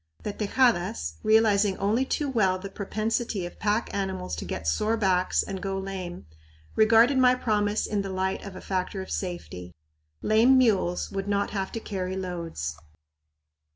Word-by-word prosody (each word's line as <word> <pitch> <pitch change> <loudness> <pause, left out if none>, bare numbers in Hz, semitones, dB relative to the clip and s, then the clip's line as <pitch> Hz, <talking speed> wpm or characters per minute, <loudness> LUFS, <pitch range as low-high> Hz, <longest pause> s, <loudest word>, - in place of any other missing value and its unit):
The 210 - -3
Tejadas, 215 -2 +1
realizing 215 -3 +3
only 220 +6 +1
too 290 +2 -1
well 200 -8 +2
the 195 +1 -8
propensity 215 0 -2
of 175 - -9
pack 210 +2 0
animals 190 - -3
to - - -5
get 80 - -5
sore 215 - +1
backs 185 -3 +2
and 190 -1 -6
go 195 -1 -2
lame, 190 -2 -6 0.5
regarded 230 +5 +5
my 255 -1 +6
promise 210 -3 0
in 210 -2 -1
the 195 - -5
light 190 0 -2
of 195 -2 -8
a - - -8
factor 190 0 -2
of - - -11
safety. 90 - -5 0.5
Lame 230 +5 +5
mules 200 -8 +2
would 195 0 -3
not 200 0 0
have 195 -2 -3
to 225 - -3
carry 190 -3 -4
loads. 170 - -4
200 Hz, 160 wpm, -26 LUFS, 185-220 Hz, 0.5 s, my